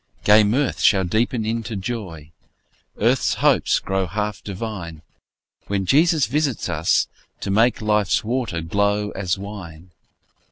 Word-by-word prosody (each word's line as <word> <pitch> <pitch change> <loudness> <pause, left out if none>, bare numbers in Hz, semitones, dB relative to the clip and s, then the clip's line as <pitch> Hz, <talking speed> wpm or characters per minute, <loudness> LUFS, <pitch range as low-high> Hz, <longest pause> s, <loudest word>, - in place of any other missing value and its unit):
Gay 105 +1 +6
mirth 125 +7 0
shall 95 -3 +4
deepen 110 +5 0
into 115 0 -3
joy, 95 -7 -6 0.7
Earth's - - +2
hopes - - +3
grow 95 -1 -2
half 105 +4 -3
divine, 95 -6 -6 0.6
When 100 -1 -1
Jesus 155 - +3
visits 140 -2 -1
us, 75 +2 +1 0.3
to - - -3
make 115 +3 +2
Life's 105 +1 +1
water 115 -7 -2
glow 100 +4 0
as 95 -1 -2
wine. 95 -4 -9
105 Hz, 125 wpm, -22 LUFS, 95-115 Hz, 0.7 s, Gay